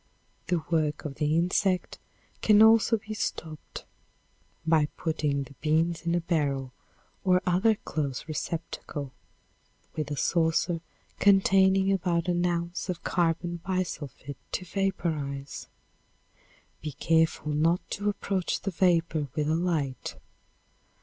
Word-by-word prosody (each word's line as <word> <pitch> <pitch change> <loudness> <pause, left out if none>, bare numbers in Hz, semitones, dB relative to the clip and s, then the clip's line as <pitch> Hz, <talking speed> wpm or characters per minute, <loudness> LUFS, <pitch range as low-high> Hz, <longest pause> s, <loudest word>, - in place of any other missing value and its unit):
The 175 -3 0
work 155 -2 0
of 135 -2 -5
the 150 +2 +2
insect 185 +2 +1 0.4
can 215 0 +6
also 225 +1 +6
be 215 0 -7
stopped 160 -7 -5 0.8
by 160 -2 +4
putting 150 -4 -1
the 140 - -13
beans 165 +2 +1
in 170 - +2
a 175 - +1
barrel 140 -6 -1 0.5
or 180 -1 +4
other 190 +5 +3
close 145 -7 -4
receptacle, 155 -3 -5 0.8
with 155 -2 -3
a 145 - -3
saucer 165 +1 +1 0.4
containing 195 -1 +5
about 180 -2 0
an 175 0 +1
ounce 170 +2 -2
of 175 -2 -3
carbon 175 0 0
bi 185 +2 -1
sulfid 140 -4 -8 0.2
to 185 - -2
vaporize. 160 -8 -2 1.1
Be 150 -1 -5
careful 160 +1 +1
not 165 +4 +1
to 205 +1 -1
approach 195 -2 -1
the 195 - -2
vapor 165 -4 +2
with 150 -2 0
a 155 - +2
light. 160 -7 -1
170 Hz, 125 wpm, -28 LUFS, 150-185 Hz, 1.1 s, can